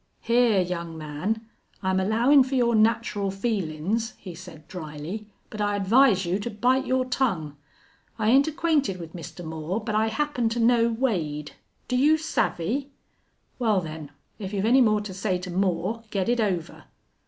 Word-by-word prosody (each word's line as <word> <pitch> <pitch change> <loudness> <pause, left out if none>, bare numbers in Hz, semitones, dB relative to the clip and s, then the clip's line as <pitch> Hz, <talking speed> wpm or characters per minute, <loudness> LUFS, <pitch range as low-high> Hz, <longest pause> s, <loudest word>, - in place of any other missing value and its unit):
"Hyar, 230 -4 +3
young 170 -2 -4
man, 160 +9 -3 0.4
I'm 190 0 +1
allowin' 235 +9 +4
for 265 +1 -3
your 240 -2 +3
natural 220 -2 +2
feelin's," 195 0 -2
he 185 -3 -9
said, 165 -3 -12
dryly, 170 +4 -7 0.2
"but 215 - -5
I 205 0 +1
advise 205 0 +4
you 180 +3 0
to 210 - -4
bite 250 +5 +1
your 260 0 +1
tongue. 200 - -1 0.6
I 220 0 +2
ain't 275 +3 +5
acquainted 305 - +1
with 165 -1 -9
Mister 175 +1 -8
Moore, 160 +4 -3
but 215 -1 -4
I 215 +1 +2
happen 245 0 0
to 235 +2 -2
know 230 0 +4
Wade. 170 - -1 0.4
Do 250 - -1
you 295 +5 +4
savvy?... 275 - -1 0.7
Wal, 220 -5 +3
then, 155 -3 -7 0.3
if 200 -1 -6
you've 200 0 0
any 255 +4 +5
more 215 -3 +3
to 205 -2 -7
say 185 0 -1
to 180 0 -7
Moore 190 +4 0
get 195 -3 -1
it 240 0 +2
over." 185 -6 -2
210 Hz, 165 wpm, -25 LUFS, 180-235 Hz, 0.7 s, ain't